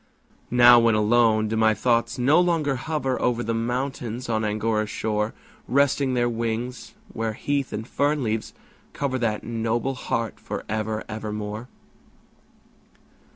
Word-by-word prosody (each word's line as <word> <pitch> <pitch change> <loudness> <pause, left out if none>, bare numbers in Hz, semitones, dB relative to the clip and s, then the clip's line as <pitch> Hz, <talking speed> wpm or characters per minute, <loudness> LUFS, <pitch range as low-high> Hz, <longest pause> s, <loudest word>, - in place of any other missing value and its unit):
Now, 120 0 +7
when 115 -1 +3
alone, 110 0 +3
do 110 - -2
my 110 0 +3
thoughts 115 +1 +1
no 135 +6 +4
longer 165 -6 +1
hover 135 -1 -2
Over 120 -1 +1
the 115 - -1
mountains 120 0 -3
on 110 -1 0
Angora's 110 0 0
shore, 105 0 -2 0.3
Resting 140 -1 +2
their 120 -1 +2
wings, 115 +1 -3 0.2
where 115 -1 -2
heath 140 +4 -2
and 110 +2 -5
fern 145 +1 0
leaves 110 -1 -2 0.4
cover 130 -2 -2
That 110 -3 -1
noble 115 +3 -1
heart 115 -4 -3
for - - -6
ever, 110 0 -2
ever 110 -1 -5
more? 105 +2 -5
115 Hz, 140 wpm, -24 LUFS, 110-130 Hz, 0.4 s, Now